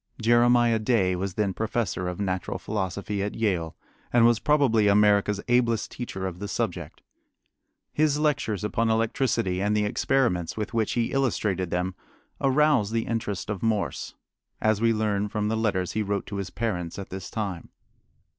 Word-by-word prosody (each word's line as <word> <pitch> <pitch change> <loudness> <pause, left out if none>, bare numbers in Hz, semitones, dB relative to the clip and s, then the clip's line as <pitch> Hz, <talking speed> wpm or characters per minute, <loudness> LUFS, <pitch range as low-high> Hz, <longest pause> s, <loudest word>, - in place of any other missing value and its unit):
Jeremiah 120 0 +4
Day 105 -5 +2
was 95 0 -3
then 100 -3 0
professor 110 -3 -2
of 90 +1 -4
natural 95 -3 -2
philosophy 100 0 -3
at 100 +1 -3
Yale, 90 -8 -1 0.4
and 120 -1 +5
was 120 -1 +4
probably 130 -8 +3
America's 105 0 +4
ablest 120 -3 +2
teacher 95 -6 -5
of 90 -2 -5
the 100 - -4
subject. 90 -8 -4 0.9
His 150 -1 +2
lectures 145 - 0
upon 115 +2 0
electricity 110 -4 0
and 105 +1 +1
the 105 - +2
experiments 105 -7 0
with 105 +1 -4
which 110 -2 0
he 120 -1 0
illustrated 105 -9 0
them 90 +2 -1 0.5
aroused 135 -6 +3
the 115 -1 0
interest 110 -4 -3
of 100 -3 -4
Morse, 110 -3 -1 0.4
as 110 -1 +1
we 115 0 +4
learn 105 -2 0
from 105 0 -1
the 110 - 0
letters 100 -5 0
he 110 - -1
wrote 100 -1 -2
to 100 - -6
his 95 -2 -4
parents 90 -5 -3
at 100 - -7
this 95 -1 -6
time. 100 -6 -4
105 Hz, 165 wpm, -26 LUFS, 95-115 Hz, 0.9 s, and